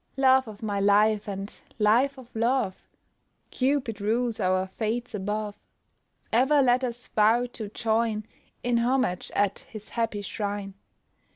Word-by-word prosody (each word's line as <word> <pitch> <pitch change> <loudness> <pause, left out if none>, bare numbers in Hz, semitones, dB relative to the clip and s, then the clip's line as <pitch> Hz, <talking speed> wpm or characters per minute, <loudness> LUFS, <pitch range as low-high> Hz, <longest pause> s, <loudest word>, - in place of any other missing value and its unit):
"Love 265 -1 +5
of 215 0 -10
my 205 -2 -1
life, 205 +1 +3
and 195 0 -6 0.2
life 240 +6 +3
of 250 -3 -14
love! 230 -4 0 0.6
Cupid 255 -5 0
rules 230 +2 0
our 185 0 +1
fates 225 +5 -3
above, 210 +1 -3 0.8
Ever 265 +6 +4
let 250 0 +3
us 245 0 -3
vow 225 +3 +3
to 215 -3 -5
join 220 0 0 0.4
In 245 -1 +2
homage 245 -6 0
at 200 -1 +1
his 215 -1 -11
happy 225 -3 -2
shrine." 200 -1 -4
220 Hz, 130 wpm, -27 LUFS, 205-245 Hz, 0.8 s, Love